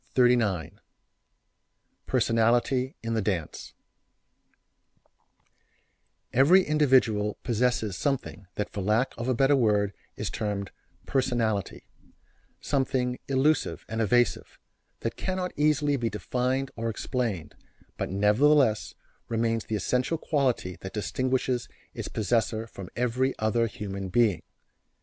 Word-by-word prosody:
[Illustration: 125 Hz, -1 st, +5 dB
NW] 95 Hz, -7 st, -1 dB, 1.4 s
PERSONALITY 120 Hz, +3 st, +2 dB
IN 115 Hz, 0 st, -2 dB
THE 110 Hz, -, +1 dB
DANCE 95 Hz, -6 st, -3 dB, 2.6 s
Every 165 Hz, +9 st, +6 dB
individual 130 Hz, -9 st, +2 dB
possesses 120 Hz, -4 st, 0 dB
something 130 Hz, -6 st, -2 dB
that 105 Hz, -, -3 dB
for 100 Hz, -, -4 dB
lack 110 Hz, +7 st, +1 dB
of 120 Hz, +1 st, -4 dB
a 130 Hz, -, +2 dB
better 135 Hz, +3 st, +4 dB
word 105 Hz, -5 st, +2 dB, 0.2 s
is 105 Hz, -3 st, -3 dB
termed 100 Hz, -3 st, -3 dB, 0.3 s
"personality;" 120 Hz, -6 st, -1 dB, 0.8 s
something 130 Hz, -3 st, 0 dB
elusive 140 Hz, +3 st, +1 dB
and 115 Hz, +1 st, -2 dB
evasive, 115 Hz, -2 st, +1 dB, 0.4 s
that 115 Hz, -, -3 dB
cannot 185 Hz, -1 st, -2 dB
easily 145 Hz, -1 st, +2 dB
be 120 Hz, -3 st, -1 dB
defined 130 Hz, +5 st, -1 dB
or 115 Hz, 0 st, -2 dB
explained, 110 Hz, -5 st, -3 dB, 0.4 s
but -, -, -2 dB
nevertheless 110 Hz, +4 st, +3 dB, 0.3 s
remains 115 Hz, -1 st, 0 dB
the 110 Hz, -, -2 dB
essential 125 Hz, +9 st, 0 dB
quality 130 Hz, -, 0 dB
that 95 Hz, +2 st, -8 dB
distinguishes 130 Hz, +2 st, -1 dB, 0.2 s
its -, -, -5 dB
possessor 110 Hz, 0 st, 0 dB
from 100 Hz, -5 st, -10 dB
every 125 Hz, +2 st, 0 dB
other 115 Hz, +2 st, +1 dB
human 100 Hz, -2 st, -5 dB
being. 105 Hz, -5 st, +2 dB
115 Hz, 110 wpm, -27 LUFS, 105-130 Hz, 2.6 s, Every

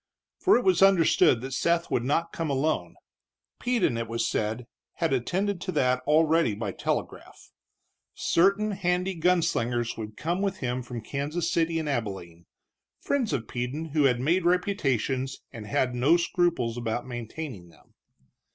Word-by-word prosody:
For 385 Hz, -, +5 dB
it 245 Hz, -, -1 dB
was 185 Hz, -2 st, +3 dB
understood 170 Hz, -10 st, +5 dB
that 130 Hz, +1 st, -6 dB
Seth 170 Hz, +5 st, 0 dB
would 120 Hz, -, +1 dB
not 165 Hz, +6 st, 0 dB
come 165 Hz, -2 st, -3 dB
alone. 145 Hz, +3 st, -1 dB, 0.6 s
Peden, 235 Hz, -, +1 dB
it 115 Hz, 0 st, -3 dB
was 115 Hz, +1 st, -1 dB
said, 110 Hz, +3 st, -2 dB, 0.3 s
had 165 Hz, -4 st, -1 dB
attended 185 Hz, -, -1 dB
to 185 Hz, -, -3 dB
that 125 Hz, 0 st, +2 dB
already 160 Hz, -5 st, +3 dB
by 105 Hz, -2 st, -3 dB
telegraph. -, -, -5 dB, 0.6 s
Certain 200 Hz, +4 st, +2 dB
handy 185 Hz, -1 st, 0 dB
gun 175 Hz, 0 st, +2 dB
slingers 120 Hz, -2 st, -1 dB
would 105 Hz, -1 st, -7 dB
come 175 Hz, +4 st, -2 dB
with 195 Hz, -1 st, -1 dB
him 125 Hz, 0 st, -2 dB
from 120 Hz, -1 st, -7 dB
Kansas 145 Hz, +8 st, -3 dB
City 165 Hz, 0 st, +1 dB
and 160 Hz, -2 st, -2 dB
Abilene, 95 Hz, -, -4 dB, 0.5 s
friends 265 Hz, -6 st, -1 dB
of 115 Hz, -4 st, -2 dB
Peden 130 Hz, +6 st, -4 dB
who 150 Hz, -3 st, +3 dB
had 125 Hz, -3 st, +3 dB
made 165 Hz, +8 st, +1 dB
reputations 135 Hz, -, 0 dB
and 110 Hz, -2 st, -9 dB
had 125 Hz, +4 st, 0 dB
no 135 Hz, +8 st, +4 dB
scruples 170 Hz, -9 st, 0 dB
about 120 Hz, 0 st, -3 dB
maintaining 120 Hz, -, -7 dB
them. 80 Hz, -, -23 dB
145 Hz, 155 wpm, -27 LUFS, 120-175 Hz, 0.6 s, For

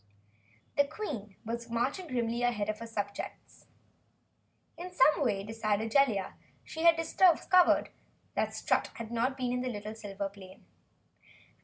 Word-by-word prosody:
The 285 Hz, -, +6 dB
Queen 280 Hz, -, -6 dB
was 235 Hz, +1 st, -4 dB
marching 260 Hz, +10 st, -1 dB
grimly 240 Hz, -3 st, -1 dB
ahead 225 Hz, -4 st, 0 dB
of 215 Hz, -, -2 dB
her 230 Hz, -, -7 dB
subjects. 205 Hz, -2 st, -6 dB, 1.1 s
In 355 Hz, +2 st, -7 dB
some 305 Hz, -4 st, +4 dB
way, 200 Hz, -6 st, 0 dB
decided 220 Hz, 0 st, -1 dB
Jellia, 230 Hz, -9 st, +2 dB, 0.3 s
she 320 Hz, -, -7 dB
had 335 Hz, -1 st, +8 dB
discovered 355 Hz, +2 st, +4 dB, 0.6 s
Strut -, -, 0 dB
had 230 Hz, -1 st, -7 dB
not 245 Hz, +3 st, 0 dB
been 250 Hz, -2 st, -1 dB
in 250 Hz, 0 st, -1 dB
the 210 Hz, 0 st, -6 dB
silver 200 Hz, -2 st, -4 dB
plane. 190 Hz, -1 st, -14 dB
230 Hz, 130 wpm, -31 LUFS, 210-275 Hz, 1.1 s, had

